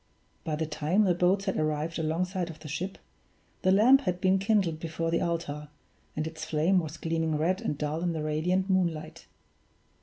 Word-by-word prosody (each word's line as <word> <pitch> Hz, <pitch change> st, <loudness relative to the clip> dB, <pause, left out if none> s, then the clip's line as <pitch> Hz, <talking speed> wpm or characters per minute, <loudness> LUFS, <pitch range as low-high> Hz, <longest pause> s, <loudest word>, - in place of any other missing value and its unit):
By 155 Hz, -, -2 dB
the 160 Hz, +1 st, -1 dB
time 160 Hz, +6 st, +1 dB
the 185 Hz, -3 st, +3 dB
boats 180 Hz, +3 st, +2 dB
had 190 Hz, -, -1 dB
arrived 155 Hz, +2 st, -1 dB
alongside 175 Hz, +3 st, -1 dB
of 160 Hz, -, -9 dB
the 155 Hz, -, -8 dB
ship, 175 Hz, +6 st, -4 dB, 0.6 s
the 185 Hz, -, +3 dB
lamp 240 Hz, +8 st, +6 dB
had 180 Hz, -8 st, -2 dB
been 190 Hz, 0 st, +3 dB
kindled 195 Hz, -6 st, +1 dB
before 165 Hz, 0 st, -3 dB
the 170 Hz, -, +1 dB
altar, 150 Hz, -3 st, -3 dB, 0.5 s
and 155 Hz, -, -1 dB
its 160 Hz, -1 st, -6 dB
flame 160 Hz, +5 st, +2 dB
was 160 Hz, -2 st, -5 dB
gleaming 160 Hz, -1 st, -1 dB
red 180 Hz, +5 st, +1 dB
and 150 Hz, -, -2 dB
dull 150 Hz, +2 st, -2 dB
in 175 Hz, 0 st, 0 dB
the 155 Hz, -2 st, -3 dB
radiant 175 Hz, +5 st, 0 dB
moonlight. 165 Hz, -4 st, -1 dB
165 Hz, 185 wpm, -28 LUFS, 155-185 Hz, 0.6 s, lamp